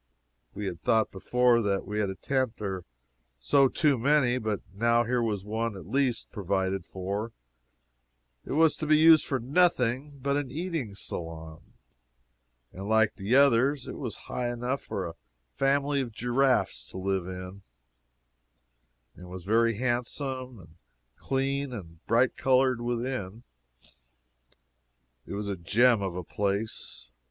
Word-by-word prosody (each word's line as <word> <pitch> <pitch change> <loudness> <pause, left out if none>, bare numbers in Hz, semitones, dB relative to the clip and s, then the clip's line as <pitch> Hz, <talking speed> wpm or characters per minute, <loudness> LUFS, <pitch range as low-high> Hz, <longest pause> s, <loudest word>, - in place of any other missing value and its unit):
I 105 - -4
had 90 -4 -4
thought 110 -1 +2
before 120 +4 +2
that 100 -2 0
we 105 +2 -3
had 105 -2 0
a 95 - -5
tent 130 +4 -1
or 95 -4 -4 0.5
so 135 - +4
too 145 -1 +1
many, 130 -1 +3
but 110 -3 -2
now 115 +3 +3
here 120 +1 0
was 105 -4 -1
one, 110 0 -2
at 90 - -10
least, 130 +3 0
provided 95 -2 -1
for; 100 +4 -4 1.1
it - - -5
was 160 +1 +4
to 155 - -4
be 155 0 +5
used 160 0 +6
for 135 - 0
nothing 140 -1 +1
but 140 +2 0
an 145 -3 -2
eating 155 - -4
saloon. 80 -3 -7 1.0
Like 105 +3 +2
the 100 +6 0
others, 135 0 +4
it - - -6
was 125 -6 -5
high 120 -1 -2
enough 125 +3 -2
for 95 - -4
a 85 - -6 0.4
family 140 - +1
of 125 -3 -5
giraffes 120 - +1
to - - -9
live 95 -1 -1
in, 95 +1 -7 1.5
and 90 0 -12
was 90 -1 -8
very 115 +2 +2
handsome 130 +1 -2
and 80 -3 -16 0.4
clean 135 - -1
and 85 -7 -9
bright 120 +2 +3
colored 130 -2 +2
within. 120 -3 -3 1.8
It - - -5
was 100 0 -4
a 100 - -2
gem 110 +6 +3
of 95 -3 -3
a 90 - -4
place. 100 - -3
115 Hz, 145 wpm, -28 LUFS, 100-130 Hz, 1.8 s, used